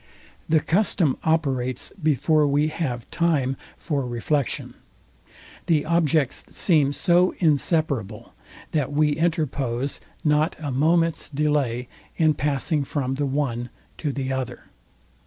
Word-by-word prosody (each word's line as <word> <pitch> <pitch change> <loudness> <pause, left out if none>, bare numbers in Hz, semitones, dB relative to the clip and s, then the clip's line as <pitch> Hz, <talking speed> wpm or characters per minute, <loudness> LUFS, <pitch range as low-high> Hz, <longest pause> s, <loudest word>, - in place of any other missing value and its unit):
The 155 -1 +4
custom 175 -5 +2
operates 135 -6 0
before 155 0 +3
we 145 +2 +2
have 130 -7 -3
time 145 -6 +1 0.2
for 145 -5 -2
reflection. 125 +3 -2 0.9
The 155 -3 +2
objects 160 -4 +1
seem 150 -6 +2
so 175 +4 +3
inseparable, 145 - 0 0.4
that 145 -3 0
we 150 +1 +2
interpose 145 -6 -1 0.2
not 150 +1 +2
a 145 -3 -4
moment's 165 +5 +2
delay 140 -5 0 0.3
in 155 -2 +4
passing 145 +2 0
from 135 -2 -2
the 140 +1 -1
one 130 -4 -2 0.3
to 150 - -1
the 135 -1 -3
other. 130 -2 -5
145 Hz, 115 wpm, -24 LUFS, 130-160 Hz, 0.9 s, The